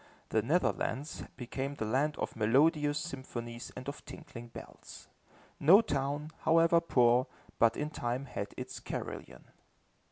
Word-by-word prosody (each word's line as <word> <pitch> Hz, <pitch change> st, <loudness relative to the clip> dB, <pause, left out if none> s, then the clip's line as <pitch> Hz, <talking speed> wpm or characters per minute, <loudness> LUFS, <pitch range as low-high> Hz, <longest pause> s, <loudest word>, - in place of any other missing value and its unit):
The 110 Hz, -, +2 dB
Netherlands 150 Hz, +1 st, -1 dB
became 135 Hz, +3 st, -4 dB
the 110 Hz, -, -3 dB
land 140 Hz, +7 st, +1 dB
of -, -, -3 dB
melodious 145 Hz, +7 st, +3 dB
symphonies 120 Hz, -6 st, -6 dB
and 130 Hz, -, -8 dB
of 140 Hz, +1 st, -6 dB
tinkling 120 Hz, 0 st, -10 dB
bells. 115 Hz, -, -11 dB, 0.5 s
No 185 Hz, +9 st, +8 dB
town, 145 Hz, -2 st, -2 dB
however 165 Hz, +1 st, +4 dB
poor, 125 Hz, -5 st, +4 dB, 0.3 s
but 115 Hz, 0 st, +4 dB
in 150 Hz, +1 st, -2 dB
time 125 Hz, -1 st, -2 dB
had 100 Hz, -6 st, -5 dB
its -, -, -6 dB
carillon. -, -, -6 dB
135 Hz, 130 wpm, -32 LUFS, 120-150 Hz, 0.5 s, No